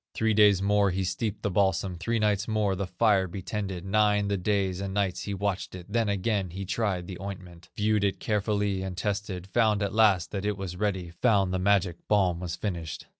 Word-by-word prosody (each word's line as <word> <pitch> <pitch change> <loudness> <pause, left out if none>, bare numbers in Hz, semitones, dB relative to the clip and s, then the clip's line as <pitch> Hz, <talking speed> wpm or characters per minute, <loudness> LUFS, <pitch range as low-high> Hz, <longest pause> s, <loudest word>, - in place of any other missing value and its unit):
Three 110 0 +2
days 105 -2 +5
more 100 0 +3
he 95 +1 -1
steeped 105 +3 -3
the 100 - 0
balsam, 95 -1 +1
Three 105 +8 -1
nights 105 -2 +1
more 105 -3 +1
the 95 0 -3
fire 95 0 +2
he 95 - -5
tended, 95 -2 -4
Nine 105 0 +2
the 100 - +1
days 95 -1 0
and 100 0 -4
nights 95 -3 -1
he 100 - -3
watched 100 -1 -2
it, 90 -1 -9
Then 110 +1 0
again 100 -1 0
he 95 +3 -6
tried 95 -2 -1
the 90 -1 -8
ointment, 90 -3 -8
Viewed 105 0 +2
it 100 -1 0
carefully 105 -2 0
and 95 -1 -5
tested, 95 -2 -3
Found 110 -3 +3
at 100 - -2
last 105 -6 +3
that 100 -2 -3
it 105 -1 -1
was 95 -2 -5
ready, 95 -3 -2
Found 100 -6 +3
the 95 - 0
magic 95 -3 +2
balm 95 -5 +2
was 90 -2 -4
finished. 85 -6 -5
100 Hz, 210 wpm, -27 LUFS, 95-105 Hz, -, days